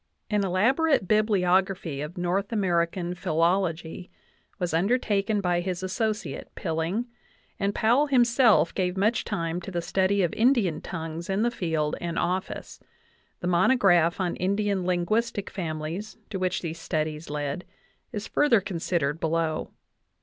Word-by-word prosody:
An 210 -1 +2
elaborate 235 - +2
Bibliography 190 -6 +2
of 150 +5 -6
North 180 +4 -1
American 175 -3 0
Philology 170 0 0 0.5
was 180 -2 -2
undertaken 205 +2 +1
by 175 -2 +1
his 180 0 -3
associate, 215 +3 -2
Pilling, 165 +6 -1 0.5
and 200 0 0
Powell 245 +7 +3
himself 240 - +4
gave 180 -1 -1
much 215 +5 +2
time 175 -4 -2
to 185 - -7
the 175 -2 -2
study 190 +3 +1
of 170 - 0
Indian 225 - +2
tongues 165 0 -6
in 195 +3 +1
the 240 - +2
field 160 -8 -1
and 170 -1 -3
office; 180 +2 -3 0.6
the 175 - -2
mono 180 +8 +4
graph 175 -7 +3
on 180 -2 -1
Indian 200 -1 0
linguistic 205 +4 0
families, 170 +4 -4
to 195 - -3
which 185 0 -1
these 165 -1 -4
studies 155 -1 -3
led, 145 +3 -3 0.5
is 210 -2 -5
further 290 -7 +4
considered 170 -5 -1
below. 165 -1 -1
185 Hz, 135 wpm, -26 LUFS, 170-205 Hz, 0.6 s, himself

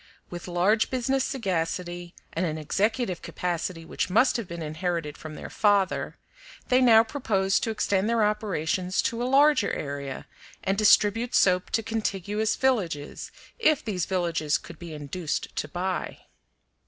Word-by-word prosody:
With 175 0 -7
large 185 +5 +2
business 260 +1 0
sagacity 175 -6 -3 0.2
and 165 - -1
an 160 -3 -1
executive 195 - -1
capacity 170 -1 -3
which - - -2
must 225 +8 +4
have 230 -6 -2
been 170 -1 -6
inherited 160 -1 -3
from 155 -1 -9
their - - -8
father, 205 -3 +1 0.5
they 255 +1 +4
now 225 -3 +7
proposed 210 -6 0
to - - -1
extend 205 -1 0
their 230 -2 +2
operations 185 -4 0
to 230 0 -1
a - - 0
larger 285 -4 +4
area 140 -2 -5 0.4
and 195 - +1
distribute 215 +3 +4
soap 180 -1 +3
to 225 - 0
contiguous 210 -1 -1
villages, 185 - -1 0.3
if 310 - +3
these 185 -6 -2
villages 170 -5 0
could 170 - -12
be 170 -2 -8
induced 150 +2 -4
to - - -1
buy. 180 +4 -3
190 Hz, 145 wpm, -26 LUFS, 170-225 Hz, 0.5 s, now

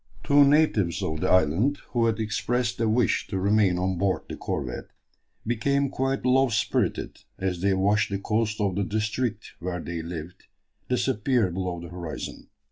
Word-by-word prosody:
Two 145 0 +6
natives 140 - +3
of 80 0 -2
the - - +1
island, 95 - +3
who 115 -2 +2
had 115 -1 0
expressed 120 +2 -1
a 115 -1 +2
wish 115 0 +1
to 95 - -3
remain 100 -1 +3
on 90 0 -1
board 95 -1 +1
the - - -6
corvette, - - -4 0.6
became 140 +5 +1
quite 135 0 -1
low 130 +1 +4
spirited 115 0 -1 0.2
as 90 -2 -2
they 100 0 +2
watched 105 +3 +2
the 100 - -1
coast 105 +2 -1
of 100 -3 +1
the 100 - 0
district 110 +2 -2
where 90 0 -3
they 85 0 -4
lived 85 +2 -8 0.4
disappear 120 -4 +1
below 90 -1 -3
the 85 0 -9
horizon. 85 -3 -7
105 Hz, 165 wpm, -26 LUFS, 90-120 Hz, 0.6 s, Two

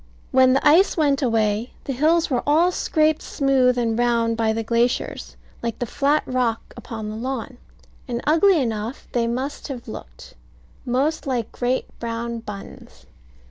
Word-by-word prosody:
When 260 0 +5
the 270 - +2
ice 345 +7 +5
went 285 -3 +2
away, 225 -2 0
the 275 - -3
hills 315 +5 +2
were 245 - +1
all 325 +5 +4
scraped 310 -3 +1
smooth 260 -3 +2
and 230 -1 0
round 235 -1 +2
by 225 -1 +1
the 225 +1 -2
glaciers, 235 +2 -1 0.2
like 235 -2 -3
the 245 - -2
flat 285 +5 +1
rock 245 -3 -1
upon 220 -2 -6
the - - -6
lawn; 255 +1 -5 0.5
and 240 -2 -2
ugly 330 +4 +4
enough 225 -1 -3
they 235 -1 0
must 260 +5 -3
have 255 -5 -7
looked, - - -10 0.5
most 280 +6 0
like 245 -4 -2
great 250 +1 -1
brown 235 0 -4
buns. 205 -3 -10
250 Hz, 155 wpm, -22 LUFS, 230-280 Hz, 0.5 s, When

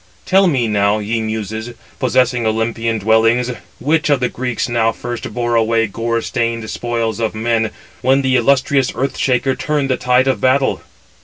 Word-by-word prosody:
Tell 190 +1 +4
me 130 -8 +1
now, 105 0 +2
ye 110 +2 -2
muses, 110 +2 -4 0.2
possessing 125 -1 +1
Olympian 115 +1 -1
dwellings, 115 +3 +2 0.3
which 155 +3 +1
of 145 -2 +3
the 125 - 0
Greeks 125 -1 -3
now 115 -2 +1
first 120 +1 -6
bore 120 -1 -2
away 115 0 +2
gore 115 +2 -2
stained 115 -1 -2
spoils 115 -2 -2
of 110 -1 -1
men, 110 0 0 0.3
when 135 +2 +3
the 130 -1 +2
illustrious 135 +1 +2
Earth 135 +1 -2
shaker 130 +1 +1
turned 145 -3 -1
the 130 - +1
[tide 125 +1 +2
of] 135 - 0
battle. 130 +1 +2
120 Hz, 165 wpm, -17 LUFS, 115-130 Hz, 0.3 s, Tell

